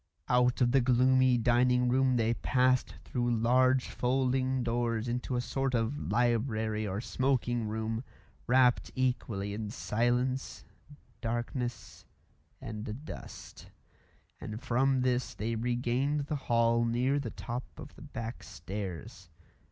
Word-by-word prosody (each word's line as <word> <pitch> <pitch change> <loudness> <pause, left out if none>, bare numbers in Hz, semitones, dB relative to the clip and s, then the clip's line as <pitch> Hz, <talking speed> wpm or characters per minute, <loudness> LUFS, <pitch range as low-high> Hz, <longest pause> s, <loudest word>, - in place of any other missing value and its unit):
Out 125 +1 +3
of 120 -1 +4
the 135 0 +4
gloomy 130 +1 +4
dining 125 +1 +3
room 130 +1 +3
they 115 -1 +2
passed 130 +1 +1
through 120 -1 -1
large 130 +3 +3
folding 130 0 0
doors 115 -1 -1
into 125 +1 -2
a 120 - +1
sort 135 +1 -1
of 115 +5 -2
library 110 -3 +1
or 95 +1 -3
smoking 120 -3 0
room, 110 +2 -3 0.4
wrapt 125 0 +4
equally 120 -6 -1
in 105 0 -4
silence, 125 +3 -1 0.6
darkness, 120 +1 -4 0.6
and 110 +5 -6
dust; - - -10 0.7
and 110 +1 -6
from 130 +2 +1
this 125 -1 0
they 110 +3 -2
regained 125 +5 0
the 145 +2 -3
hall 115 0 +3
near 125 +4 +1
the 140 - -4
top 125 0 -5
of - - -10
the - - -15
back 120 -5 -6
stairs. 95 - -7
120 Hz, 125 wpm, -31 LUFS, 115-130 Hz, 0.7 s, of